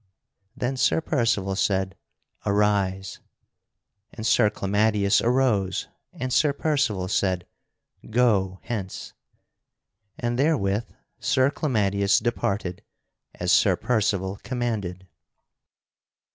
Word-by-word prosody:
Then 130 Hz, +2 st, -2 dB
Sir 130 Hz, -, +3 dB
Percival 105 Hz, -10 st, 0 dB
said: 95 Hz, -2 st, 0 dB, 0.5 s
"Arise"; 100 Hz, -2 st, 0 dB, 0.9 s
and 110 Hz, -, -7 dB
Sir 105 Hz, -, +4 dB
Clamadius 105 Hz, 0 st, +2 dB
arose; 115 Hz, -7 st, +1 dB, 0.2 s
and 130 Hz, 0 st, -4 dB
Sir 150 Hz, -2 st, +3 dB
Percival 140 Hz, -12 st, 0 dB
said: 95 Hz, -2 st, 0 dB, 0.6 s
"Go 105 Hz, -6 st, +2 dB
hence"; 105 Hz, -6 st, -5 dB, 1.0 s
and 120 Hz, +1 st, -2 dB
therewith 115 Hz, -8 st, +1 dB, 0.3 s
Sir 130 Hz, +1 st, +2 dB
Clamadius 100 Hz, -9 st, +1 dB
departed 100 Hz, -6 st, -2 dB, 0.5 s
as -, -, -1 dB
Sir -, -, +5 dB
Percival 100 Hz, -4 st, 0 dB
commanded. 110 Hz, -7 st, -3 dB
105 Hz, 90 wpm, -25 LUFS, 95-120 Hz, 1.0 s, Sir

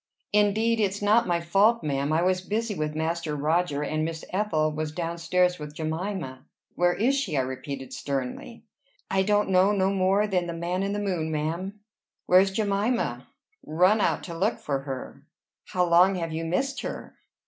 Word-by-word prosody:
"Indeed 215 Hz, +2 st, +3 dB
it's 200 Hz, -1 st, 0 dB
not 215 Hz, +3 st, +3 dB
my 175 Hz, -1 st, +1 dB
fault, 200 Hz, +7 st, +3 dB
ma'am. 140 Hz, 0 st, -1 dB
I 160 Hz, +2 st, +2 dB
was 185 Hz, 0 st, +1 dB
busy 215 Hz, +3 st, -2 dB
with 155 Hz, -3 st, -3 dB
Master 160 Hz, -1 st, -2 dB
Roger, 150 Hz, 0 st, 0 dB
and 155 Hz, +1 st, -1 dB
Miss 160 Hz, 0 st, -4 dB
Ethel 170 Hz, -6 st, +1 dB
was 155 Hz, 0 st, -3 dB
down 170 Hz, +1 st, -4 dB
stairs 180 Hz, +1 st, +2 dB
with 150 Hz, 0 st, -8 dB
Jemima." 160 Hz, -4 st, -4 dB, 0.3 s
"Where 175 Hz, 0 st, +2 dB
is 245 Hz, +6 st, +2 dB
she?" 230 Hz, -, -1 dB
I -, -, +3 dB
repeated 130 Hz, +1 st, -6 dB
sternly. 140 Hz, -, -5 dB, 0.5 s
"I 190 Hz, -, +3 dB
don't 205 Hz, 0 st, +2 dB
know 185 Hz, +2 st, +5 dB
no 195 Hz, -1 st, +2 dB
more 195 Hz, +2 st, +2 dB
than 180 Hz, -4 st, 0 dB
the 170 Hz, -, -4 dB
man 175 Hz, +2 st, -2 dB
in 200 Hz, +1 st, -1 dB
the -, -, -2 dB
moon, 180 Hz, -6 st, -1 dB
ma'am." 170 Hz, +7 st, -3 dB, 0.4 s
"Where's 185 Hz, +2 st, +5 dB
Jemima?" 205 Hz, +4 st, -1 dB, 0.4 s
"Run 185 Hz, +7 st, +3 dB
out -, -, +1 dB
to 170 Hz, -, -7 dB
look 195 Hz, +7 st, 0 dB
for 140 Hz, -2 st, -2 dB
her?" 135 Hz, -1 st, -7 dB, 0.4 s
"How 180 Hz, -1 st, 0 dB
long 180 Hz, +3 st, +5 dB
have 165 Hz, -3 st, -3 dB
you 165 Hz, +1 st, -3 dB
missed 265 Hz, +12 st, -1 dB
her?" -, -, -7 dB
180 Hz, 180 wpm, -26 LUFS, 155-200 Hz, 0.5 s, know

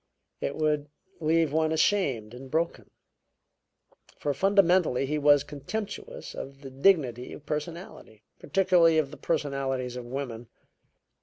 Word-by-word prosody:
It 140 Hz, -, -3 dB
would 150 Hz, -2 st, 0 dB, 0.3 s
leave 160 Hz, -1 st, +2 dB
one 160 Hz, 0 st, +2 dB
ashamed 145 Hz, -, +1 dB
and 130 Hz, +2 st, -10 dB
broken, 165 Hz, +4 st, -1 dB, 1.3 s
for 145 Hz, -, -1 dB
fundamentally 180 Hz, -5 st, +3 dB
he 150 Hz, +2 st, -1 dB
was 145 Hz, -1 st, +5 dB
contemptuous 210 Hz, -, -6 dB
of 135 Hz, 0 st, -8 dB
the 135 Hz, -2 st, -9 dB
dignity 130 Hz, -5 st, +2 dB
of 150 Hz, -, -11 dB
personality, 150 Hz, -, -6 dB, 0.2 s
particularly 175 Hz, -1 st, +4 dB
of 145 Hz, -3 st, +1 dB
the 150 Hz, -, -10 dB
personalities 135 Hz, -5 st, -2 dB
of 125 Hz, -1 st, -6 dB
women. 120 Hz, -2 st, -5 dB
150 Hz, 125 wpm, -28 LUFS, 135-165 Hz, 1.3 s, was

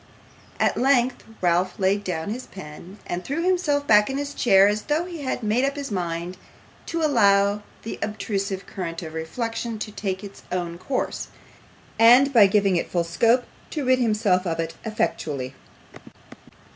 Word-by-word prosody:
At -, -, +2 dB
length 255 Hz, -1 st, +2 dB, 0.2 s
Ralph 180 Hz, +1 st, +1 dB
laid 195 Hz, +2 st, +1 dB
down 175 Hz, 0 st, -3 dB
his 250 Hz, +3 st, -6 dB
pen, 180 Hz, +2 st, -11 dB
and 175 Hz, +1 st, -4 dB
threw 305 Hz, +5 st, -2 dB
himself 330 Hz, -6 st, +1 dB
back 210 Hz, -3 st, +5 dB
in 270 Hz, -, -2 dB
his 285 Hz, 0 st, -4 dB
chair 195 Hz, -7 st, +5 dB
as 210 Hz, +1 st, 0 dB
though 305 Hz, +6 st, -1 dB
he 345 Hz, -4 st, -7 dB
had 260 Hz, -3 st, -3 dB
made 220 Hz, +4 st, +1 dB
up 275 Hz, +1 st, 0 dB
his 280 Hz, -4 st, -5 dB
mind 175 Hz, -1 st, -3 dB, 0.5 s
to 330 Hz, -1 st, -2 dB
allow 200 Hz, -7 st, +3 dB, 0.2 s
the 225 Hz, -, -6 dB
obtrusive 200 Hz, -2 st, -3 dB
current 170 Hz, -3 st, -5 dB
of 160 Hz, -1 st, -7 dB
reflection 225 Hz, +7 st, -4 dB
to 210 Hz, 0 st, -5 dB
take 190 Hz, -2 st, -4 dB
its 200 Hz, -1 st, -10 dB
own 175 Hz, -2 st, -3 dB
course, 255 Hz, +8 st, -3 dB, 0.7 s
and, 250 Hz, +5 st, +7 dB
by 215 Hz, -5 st, +8 dB
giving 195 Hz, -2 st, +2 dB
it -, -, -2 dB
full 175 Hz, -1 st, 0 dB
scope, 230 Hz, +9 st, +2 dB, 0.3 s
to 295 Hz, -4 st, -3 dB
rid 255 Hz, 0 st, +4 dB
himself 210 Hz, -6 st, +2 dB
of 165 Hz, -1 st, -2 dB
it 165 Hz, 0 st, -2 dB
effectually. 155 Hz, -, -2 dB
210 Hz, 165 wpm, -24 LUFS, 180-255 Hz, 0.7 s, by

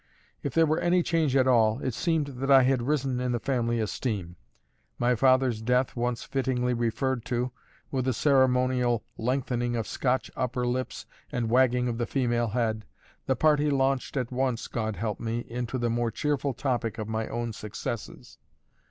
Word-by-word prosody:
If 140 Hz, -, -4 dB
there 165 Hz, 0 st, +5 dB
were 155 Hz, +1 st, +1 dB
any 175 Hz, 0 st, +2 dB
change 160 Hz, -6 st, +1 dB
at 130 Hz, -1 st, +4 dB
all, 110 Hz, -3 st, +4 dB
it 130 Hz, -, -2 dB
seemed 160 Hz, +4 st, 0 dB
that 135 Hz, -1 st, -5 dB
I 135 Hz, -1 st, +8 dB
had 130 Hz, -1 st, +2 dB
risen 135 Hz, -1 st, 0 dB
in 125 Hz, -1 st, -1 dB
the 120 Hz, -, 0 dB
family 120 Hz, -2 st, 0 dB
esteem. 105 Hz, -5 st, -3 dB, 0.6 s
My 120 Hz, +1 st, +2 dB
father's 130 Hz, -2 st, +3 dB
death 125 Hz, +2 st, +1 dB
once 120 Hz, -1 st, -1 dB
fittingly 130 Hz, -2 st, 0 dB
referred 120 Hz, +1 st, -1 dB
to, 125 Hz, +1 st, -1 dB, 0.4 s
with 130 Hz, -2 st, -1 dB
a 130 Hz, -, +2 dB
ceremonial 125 Hz, -3 st, +2 dB, 0.2 s
lengthening 120 Hz, 0 st, -1 dB
of 115 Hz, -2 st, -1 dB
Scotch 130 Hz, +3 st, -1 dB
upper 125 Hz, 0 st, -1 dB
lips 125 Hz, +1 st, -3 dB, 0.3 s
and 115 Hz, -2 st, -1 dB
wagging 125 Hz, 0 st, +3 dB
of 120 Hz, -1 st, -2 dB
the 120 Hz, -, -1 dB
female 120 Hz, -3 st, +1 dB
head, 110 Hz, -1 st, -1 dB, 0.4 s
the 130 Hz, -, +2 dB
party 150 Hz, +1 st, +3 dB
launched 135 Hz, 0 st, 0 dB
at 125 Hz, -2 st, -2 dB
once 125 Hz, -2 st, -1 dB
(God 110 Hz, -3 st, -2 dB
help 105 Hz, +2 st, -3 dB
me) 115 Hz, 0 st, -2 dB
into 120 Hz, +2 st, -3 dB
the 120 Hz, -2 st, 0 dB
more 120 Hz, 0 st, 0 dB
cheerful 145 Hz, 0 st, -1 dB
topic 120 Hz, -4 st, -1 dB
of 110 Hz, -2 st, -4 dB
my 110 Hz, 0 st, -2 dB
own 120 Hz, -1 st, -3 dB
successes. 105 Hz, +1 st, -6 dB
125 Hz, 175 wpm, -27 LUFS, 115-130 Hz, 0.6 s, I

